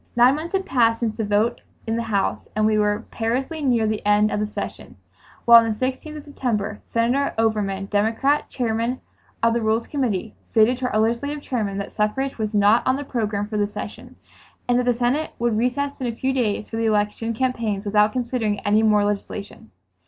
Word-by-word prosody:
Nine 245 +2 +6
months 325 +4 -6
had 385 0 0
passed 230 -6 +2
since 225 -2 -1
the 220 - -2
vote 210 +3 +1 0.2
in 225 0 -1
the 230 - -1
House 215 -4 -1
and 215 0 +2
we 215 0 +3
were 210 +2 0
perilously 260 +8 -2
near 245 -5 +2
the 215 -1 -2
end 210 +1 +3
of - - -1
the 210 - -1
session, 210 - -7 0.5
when 235 0 +10
on 225 - -1
the 215 - -4
16th 265 +5 -3
of 295 - -9
September, 225 -8 -3
Senator 245 +5 0
Overman, 210 -3 0
Democrat, 225 +8 +1
Chairman 235 0 -1 0.4
of 230 0 +4
the 235 - 0
Rules 220 +1 +1
Committee, 225 -7 -2 0.2
stated 230 +3 +3
to 250 -1 -1
our 215 - +1
Legislative 280 +7 -1
Chairman 210 -6 -2
that 200 - -5
suffrage 240 +5 -1
was 215 0 -2
"not 205 +3 +5
on 260 - +3
the 285 - -4
program 215 -6 -2
for 215 0 -3
this 205 0 -1
session" - - -8 0.5
and 245 0 +3
that 250 - 0
the 245 -1 +2
Senate 250 +6 0
would 235 -1 0
recess 250 +5 0
in 250 - -1
a 230 - -3
few 265 +3 -1
days 215 -5 -1
for 225 - -5
the 225 - 0
election 215 +2 0
campaigns 225 -5 -1
without 210 +1 +3
considering 235 -4 -1
any 210 0 +3
more 210 -2 +3
legislation. 205 +1 -5
225 Hz, 205 wpm, -22 LUFS, 210-250 Hz, 0.5 s, when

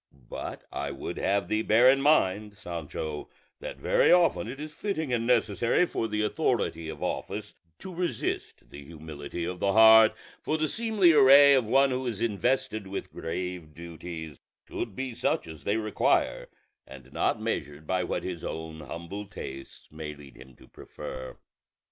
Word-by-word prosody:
But - - -6
I 70 - -3
would 70 -1 -6
have 100 -2 +1
thee 110 +3 0
bear 110 +3 +5
in 135 +1 +5
mind, 105 -8 +2
Sancho, 80 -4 -6 0.3
that - - -7
very - - +3
often 175 -10 +4
it 130 +4 -7
is 155 0 -7
fitting 160 -6 -3
and 115 -1 0
necessary 115 - +2
for 115 - -2
the 105 0 -1
authority 105 - -1
of - - -7
office - - -4 0.2
to 190 - -9
resist 170 -9 -3
the 70 - -10
humility 80 +1 -7
of 90 +1 -5
the 100 +1 +1
heart; 110 0 +8 0.3
for 155 - -1
the 155 0 0
seemly 220 -3 +3
array 140 0 +8
of 130 -4 +3
one 135 +4 +4
who 130 0 -2
is 110 -4 -3
invested 115 0 -1
with 95 - -6
grave 85 -2 -5
duties 85 -2 -8 0.3
should - - -5
be 130 -1 -4
such - - 0
as 80 -3 -11
they 105 +2 +1
require, 110 -1 +1 0.4
and 65 -1 -13
not - - 0
measured 75 +1 -4
by 90 +2 0
what - - -3
his 90 -3 -5
own 80 0 -6
humble 85 +6 -7
tastes 70 -8 -9
may 75 -1 -7
lead 70 -3 -14
him 65 -1 -15
to - - -18
prefer. 65 0 -9
100 Hz, 165 wpm, -28 LUFS, 80-130 Hz, 0.4 s, heart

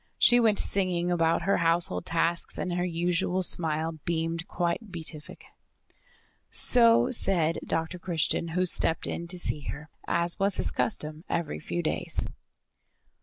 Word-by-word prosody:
She 245 - +5
went 220 -3 +3
singing 180 -3 +1
about 165 -1 +1
her 195 - +2
household 165 - +1
tasks 170 0 -1
and 180 - -3
her 175 0 -1
usual 180 +1 -1
smile 160 -2 0
beamed 165 -1 -2
quite 175 +5 -3
beatific. 160 -3 -6 1.0
So 230 -2 +4
said 170 -8 +3
Dr. 165 +2 -3
Christian, 170 -1 -1
who 185 - +2
stepped 165 -2 +1
in 170 - -5
to 180 +1 -3
see 150 -5 -2
her, 150 +1 -7 0.2
as 170 0 0
was 195 0 +2
his - - -1
custom 155 -6 -2
every 170 -3 -2
few 175 +3 -4
days. 155 - -2
170 Hz, 140 wpm, -27 LUFS, 165-180 Hz, 1.0 s, She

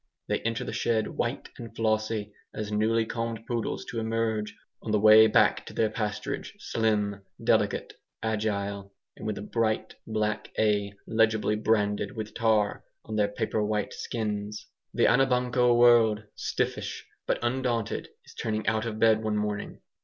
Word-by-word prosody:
They - - 0
enter 115 0 -2
the - - -5
shed 110 -2 +1
white - - -3
and 115 -2 -9
flossy 110 -1 0 0.2
as 105 -1 -4
newly 110 +2 +2
combed 115 0 -4
poodles 120 -3 -2
to 115 - -3
emerge, 110 -1 -1 0.2
on - - -7
the 105 0 +3
way 110 +1 +8
back 110 - +3
to - - -8
their 110 -1 +1
pasturage, 105 -2 -3
slim, 105 -3 0 0.2
delicate, - - +1 0.3
agile, 100 -2 -2 0.3
with 110 -1 -3
a - - -5
bright 110 0 -1
black 105 -1 -1
A 105 -2 +2
legibly 110 -1 +2
branded 105 0 0
with 110 -1 -5
tar 110 -3 +1 0.2
on 110 - -5
their 105 -1 +3
paper 105 +1 -1
white 105 -1 -1
skins. 105 -2 -4 0.3
The - - +2
Anabanco 125 -2 +3
world 115 -3 +5
stiffish - - -3 0.2
but - - +2
undaunted 120 -2 -1 0.2
is - - -15
turning 110 -1 -2
out 110 +1 0
of 110 -2 -4
bed 110 0 +4
one 110 -1 0
morning. 105 -1 -3
110 Hz, 150 wpm, -28 LUFS, 105-115 Hz, 0.3 s, way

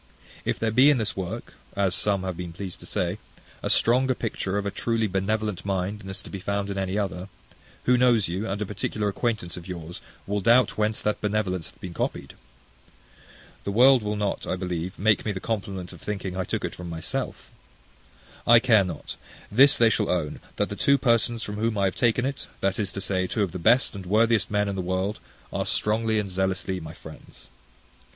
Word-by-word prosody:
If - - 0
there 110 -1 0
be 130 +6 +6
in 145 - +4
this 110 -3 -1
work, 95 +5 -5 0.2
as 100 -2 +2
some 100 0 +1
have 95 -1 -3
been 85 -1 -6
pleased 95 +1 -6
to - - -10
say, - - -1 0.4
a - - -2
stronger 130 +2 +4
picture 100 -4 -2
of 100 - -2
a 100 - -1
truly 115 +1 0
benevolent 105 +1 -1
mind 100 +1 -2
than 95 -2 -9
is 95 +1 -6
to - - -11
be 100 - -5
found 100 +1 -2
in 100 - -4
any 95 +1 -1
other, 95 -2 -3 0.5
who - - +2
that 125 - +6
knows 120 -5 +4
you, 95 +6 -3
and 95 +1 -2
a 105 - -1
particular 105 +1 -2
acquaintance 105 -5 -2
of 85 0 -9
yours, 85 -2 -7 0.2
will 100 +1 -1
doubt 120 +5 +4
whence 110 0 0
that 105 - 0
benevolence 100 -5 -1
hath - - -18
been 90 -2 -7
copied? - - -3 1.3
The 100 - -2
world 125 +4 +6
will 105 0 -2
not, 105 -1 -2
I - - 0
believe, 90 0 -4
make 105 +1 +3
me 105 - -1
the 95 - -4
compliment 95 -4 -4
of 90 - -13
thinking 100 -3 -4
I 95 -1 -1
took - - -2
it - - -4
from 90 -1 -7
myself. 80 -1 -4 1.0
I 120 - +9
care 115 -4 +5
not: 85 -5 -6 0.3
this 135 +6 +6
they 115 -1 +5
shall - - +1
own, 85 -5 -1 0.2
that - - 0
the - - -4
two 140 0 +4
persons 115 -2 +2
from 105 0 -5
whom 110 0 0
I 100 - +2
have 95 - 0
taken 120 +1 +2
it, 135 0 -4
that 95 +1 +1
is 100 -3 0
to 100 - -4
say, 95 -1 0
two 105 +3 0
of 95 - -2
the 90 - -5
best 120 +9 +4
and 95 -3 -8
worthiest 110 +3 +3
men 105 0 +1
in 100 - -2
the 95 - -2
world, 95 +3 -1 0.3
are - - 0
strongly 110 +1 +1
and 100 -3 -2
zealously 95 0 -1
my 80 - -9
friends. - - -13
100 Hz, 215 wpm, -26 LUFS, 95-110 Hz, 1.3 s, I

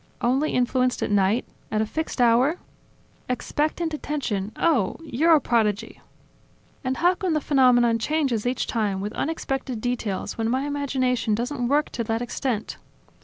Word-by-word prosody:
"Only 265 +6 +1
influenced 250 0 +1
at - - -2
night? 205 +4 +2 0.2
At 215 - 0
a 220 - +2
fixed 315 +5 -4
hour?" 245 +6 +4 0.7
"Expectant 310 +6 -1
attention, 245 -10 -3
oh! 265 - +1
You're 320 +3 +3
a - - +4
prodigy." 225 -3 0 0.8
"And 260 0 -1
how 355 +2 +4
come 370 -3 -1
the 305 - +2
phenomenon 250 -5 +4
changes 265 -4 0
each 250 0 0
time, 210 -5 -1
with 205 +3 -4
unexpected 270 -5 -3
details, 230 -4 -3
when 225 0 0
my 260 +3 0
imagination 260 -6 0
doesn't 245 +2 -2
work 295 +3 +1
to 235 - -2
that 225 +1 -1
extent?" 240 -2 -3
250 Hz, 150 wpm, -24 LUFS, 225-290 Hz, 0.8 s, hour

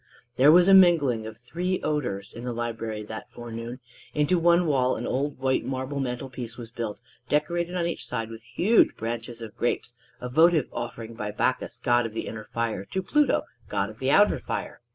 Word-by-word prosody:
There 140 +4 +7
was 175 +2 +7
a 195 - +7
mingling 150 -12 +5
of 110 -1 -9
three 175 +10 -2
odors 125 -10 -2
in 115 - -8
the 125 -1 -3
library 115 -2 -4
that 110 +1 -8
forenoon. 120 +1 -7 0.4
Into 150 +4 +2
one 170 +1 +4
wall 130 -4 +2
an - - -4
old 140 +2 -1
white 130 0 +1
marble 130 +2 -3
mantel 130 0 -3
piece 125 -3 -7
was 115 -2 -9
built, 115 -2 -5 0.3
decorated 170 +4 0
on 175 -1 0
each 170 - -4
side 115 -2 -3
with 115 0 -9
huge 175 - +3
bunches 115 +1 -4
of 110 - -9
grapes 120 0 -1 0.3
a 125 - -5
votive 160 +3 +4
offering 115 -1 -5
by 105 -2 -4
Bacchus, - - -1
god 120 -1 +2
of 110 - -11
the - - -3
inner 110 -1 -6
fire, 115 -4 -2
to 190 - -3
Pluto, 295 +9 +2 0.3
god - - -1
of - - -16
the - - 0
outer - - +5
fire. - - -5
125 Hz, 195 wpm, -26 LUFS, 115-155 Hz, 0.4 s, There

